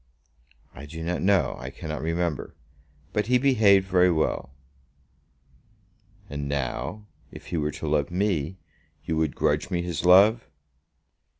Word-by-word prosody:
"I 70 +4 -10
do 80 +2 -7
not 90 +1 -2
know. 95 0 +2
I - - -6
cannot 75 -1 -6
remember. 85 -1 -2 0.6
But 105 0 0
he 125 +1 +4
behaved 110 -8 +4
very 90 -1 +4
well." 80 -5 -1 1.8
"And 70 -1 -5
now, 70 - -3 0.3
if - - -12
he - - +1
were 75 -1 0
to 80 - -6
love 75 -1 +1
me, 90 -3 -1 0.5
you 80 - -1
would 80 -3 0
grudge - - 0
me 85 -1 -1
his 85 -4 -4
love?" 100 +6 +5
85 Hz, 135 wpm, -25 LUFS, 75-100 Hz, 1.8 s, love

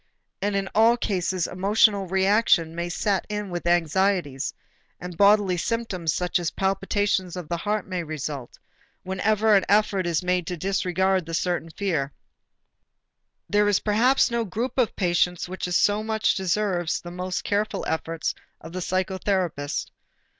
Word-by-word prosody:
And 205 0 0
in 195 -1 -1
all 230 +2 +5
cases 185 -5 -1
emotional 200 +1 +2
reaction 190 -3 +3
may 170 +1 -3
set 195 +2 0
in 210 -2 -4
with 175 0 -4
anxieties, 175 -4 +1 0.5
and 180 -1 -7
bodily 200 -1 +4
symptoms 190 -5 -1
such 180 +2 0
as 170 -2 -1
palpitation 195 0 0
of 180 -4 -6
the 170 - -2
heart 210 +3 -2
may 185 -2 -3
result, 150 -5 -6 0.5
whenever 210 +3 +2
an 195 - +4
effort 200 -3 +2
is 170 0 0
made 180 -2 0
to 180 - -3
disregard 190 0 0
the 165 0 -1
nervous 175 -2 -2
fear. 155 -9 -1 1.3
There 205 +1 +3
is 205 -2 +3
perhaps 240 +5 +3
no 235 0 0
group 230 +7 -3
of 240 - +1
patients 180 -1 +1
which 185 +1 -5
so 205 +4 +2
much 220 0 +1
deserves 185 -2 0
the 175 - -9
most 180 +1 -4
careful 210 +1 -1
efforts 160 0 -2 0.3
of 165 +1 -11
the 185 - -3
psychotherapist. 185 -4 -1
185 Hz, 145 wpm, -25 LUFS, 175-205 Hz, 1.3 s, all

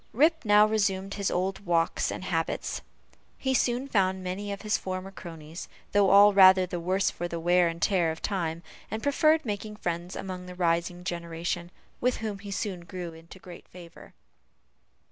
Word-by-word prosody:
Rip 320 +6 +3
now 210 -1 +6
resumed 200 -2 0
his 200 -1 -1
old 190 +2 -1
walks 170 -4 0
and - - -6
habits; 165 -3 -2 0.6
he 265 -1 -1
soon 250 +1 +1
found 190 -5 +1
many 195 +3 -4
of 200 - -6
his 215 0 +1
former 185 +1 -4
cronies, 165 -3 -9 0.2
though 200 -1 +4
all 200 +1 +7
rather 190 -1 +7
the 175 -1 -4
worse 185 +3 +1
for 175 - -4
the 170 -1 -5
wear 175 +1 +3
and 165 0 -4
tear 175 -1 +2
of 160 0 -4
time; 170 -4 -2 0.3
and 220 +2 -4
preferred 310 +2 +3
making 210 0 -4
friends 175 -2 -4
among 185 -1 -6
the 180 - -9
rising 175 0 0
generation, 170 0 -4 0.3
with 250 0 +1
whom 215 -3 -4
he 200 0 -9
soon 195 -2 -3
grew 175 0 -7
into 165 +3 -13
great 180 -2 -12
favor. 170 -2 -14
185 Hz, 175 wpm, -28 LUFS, 175-205 Hz, 0.6 s, all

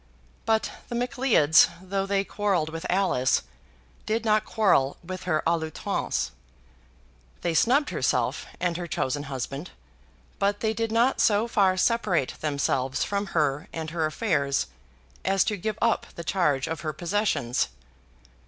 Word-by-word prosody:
But 220 -1 +2 0.2
the 240 - -3
Macleods, 245 - +4
though 195 +1 -2
they 195 0 +1
quarrelled 195 -6 0
with 165 +1 -5
Alice, 180 -9 +2 0.6
did 225 +1 0
not 215 -1 +3
quarrel 180 -11 +2
with 185 +1 -7
her 155 -4 +1
à 170 0 +2
l'outrance. 155 - -2 1.1
They 170 - 0
snubbed 265 - +3
herself - - 0
and 175 -2 0
her 175 -1 -4
chosen 145 -2 -2
husband; 135 +4 -5 0.7
but 200 +1 +1
they 220 -1 +1
did 225 0 -2
not 235 +4 +3
so 215 +1 +3
far 195 -5 +3
separate 190 - +1
themselves 140 -3 0
from 200 0 -2
her 150 +3 +1
and 160 -1 -5
her 160 -2 0
affairs 150 - 0 0.6
as 195 -1 +3
to 210 - -1
give 210 +2 -3
up 230 - +2
the 170 - -6
charge 150 -7 +1
of 160 -1 -4
her 155 -2 -3
possessions. 175 - 0
185 Hz, 145 wpm, -26 LUFS, 155-215 Hz, 1.1 s, Macleods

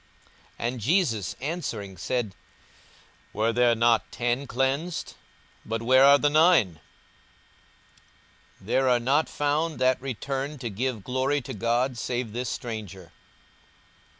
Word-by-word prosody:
42:017:017 115 - -1
And 125 - -7
Jesus 115 - +1
answering 120 - -4
said, 105 +3 -2 1.0
Were 110 +2 +1
there 120 -1 +3
not 115 0 +2
ten 120 +3 -1
cleansed? 135 +8 -2 0.5
but 115 +1 -4
where 130 +2 +5
are 140 +1 +8
the 145 - +2
nine? 155 - +4 1.8
42:017:018 - - -16
There 130 -1 +2
are 125 -1 +4
not 135 +6 +1
found 150 +1 -1
that 130 0 +2
returned 135 +3 -4
to 120 -3 -4
give 115 0 -3
glory 130 +4 0
to - - -7
God, 120 +3 0
save 120 -2 -3
this 125 +1 -3
stranger. 105 -7 -6
125 Hz, 125 wpm, -26 LUFS, 115-140 Hz, 1.8 s, are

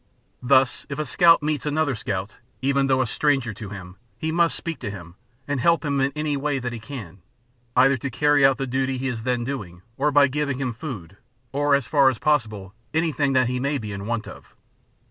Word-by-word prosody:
Thus 130 0 +3
if 140 - -4
a 155 - -2
scout 165 -1 +5
meets 150 -1 -1
another 150 -1 +1
scout, 100 -2 -4 0.2
even 140 +1 +1
though 130 -1 +3
a - - +1
stranger 135 -2 0
to 105 -1 -8
him, 95 -2 -9 0.2
he 160 - -2
must 170 0 +2
speak 165 -5 -5
to 120 - -4
him, 85 -4 -9 0.3
and 145 -1 -1
help 170 +4 +2
him 140 -2 0
in 135 +1 +1
any 150 -1 -1
way 140 0 -1
that 125 -2 -4
he 115 - -6
can, 110 - -9 0.5
either 135 0 +5
to 135 +3 -4
carry 145 +2 +3
out 135 -1 +5
the 135 - -2
duty 130 +1 -1
he 130 +1 -2
is 115 -3 -4
then 125 0 -1
doing, 105 -10 -6
or 145 +2 +2
by 145 -1 +5
giving 140 -1 -2
him 130 -3 -2
food, 105 - -8 0.3
or, 145 +1 +2
as 140 -3 0
far 140 +1 +4
as 130 - -3
possible, 110 -10 0 0.2
anything 150 -4 +1
that 130 -1 +4
he 125 +1 -1
may 140 +3 0
be 110 -4 -6
in 100 0 -6
want 115 -2 -2
of. - - -13
135 Hz, 220 wpm, -23 LUFS, 115-145 Hz, 0.5 s, scout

